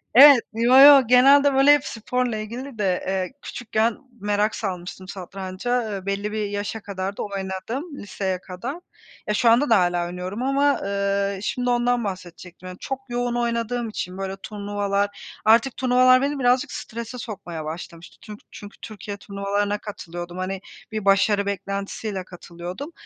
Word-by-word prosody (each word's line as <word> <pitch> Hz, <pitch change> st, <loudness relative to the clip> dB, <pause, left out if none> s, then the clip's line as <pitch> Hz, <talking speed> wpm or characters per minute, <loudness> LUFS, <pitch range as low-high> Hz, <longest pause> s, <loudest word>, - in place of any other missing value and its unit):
evet, 275 Hz, -1 st, +10 dB
yo, 235 Hz, +3 st, +4 dB
yo 275 Hz, -3 st, +9 dB
genelde, 275 Hz, +3 st, +6 dB
böyle, 270 Hz, +2 st, +6 dB
hep 290 Hz, -1 st, +1 dB
sporla 240 Hz, 0 st, -2 dB
ilgili 235 Hz, +4 st, -7 dB
de, 190 Hz, -4 st, 0 dB
eee, 190 Hz, +3 st, -2 dB
küçükken 230 Hz, -1 st, -1 dB, 0.2 s
merak 205 Hz, +1 st, 0 dB
salmıştım 185 Hz, -2 st, -5 dB
satranca, 195 Hz, +5 st, -3 dB
eee, 195 Hz, -2 st, -5 dB
belli 200 Hz, +1 st, -2 dB
bir 215 Hz, -1 st, -2 dB
yaşa 205 Hz, +2 st, -3 dB
kadar 195 Hz, 0 st, -5 dB
da -, -, -2 dB
oynadım 205 Hz, -, -5 dB
liseye 190 Hz, -2 st, -3 dB
kadar. 235 Hz, -, -6 dB, 0.5 s
Ya, 210 Hz, -, +1 dB
şu 230 Hz, +3 st, +3 dB
anda 245 Hz, +6 st, +4 dB
da 225 Hz, -3 st, +6 dB
hâlâ 175 Hz, -1 st, +1 dB
oynuyorum 180 Hz, +6 st, -5 dB
ama, 280 Hz, +2 st, +2 dB
eee, 200 Hz, 0 st, -1 dB
şimdi 245 Hz, +4 st, -2 dB
ondan 245 Hz, 0 st, +1 dB
bahsedecektim. 185 Hz, -2 st, -8 dB
Yani, 180 Hz, 0 st, -8 dB
çok 270 Hz, -1 st, -4 dB
yoğun 240 Hz, 0 st, -1 dB
oynadığım 235 Hz, 0 st, -1 dB
için 185 Hz, -3 st, -5 dB
böyle 195 Hz, 0 st, -4 dB
turnuvalar, 205 Hz, -1 st, -3 dB
artık 230 Hz, +4 st, +4 dB
turnuvalar 255 Hz, 0 st, +5 dB
beni 280 Hz, +1 st, -1 dB
birazcık 255 Hz, +3 st, +2 dB
strese 235 Hz, +2 st, -6 dB
sokmaya 175 Hz, -9 st, -7 dB
başlamıştı. 165 Hz, +1 st, -8 dB
Tünk 210 Hz, -1 st, -10 dB
çünkü 205 Hz, 0 st, -11 dB
Türkiye 205 Hz, -1 st, -7 dB
turnuvalarına 200 Hz, +1 st, -2 dB
katılıyordum. 175 Hz, -4 st, -8 dB
Hani, 185 Hz, +1 st, -3 dB, 0.3 s
bir 215 Hz, -2 st, -4 dB
başarı 200 Hz, +1 st, +3 dB
beklentisiyle 200 Hz, 0 st, -4 dB
katılıyordum. 180 Hz, -, -8 dB
205 Hz, 150 wpm, -23 LUFS, 190-245 Hz, 0.5 s, evet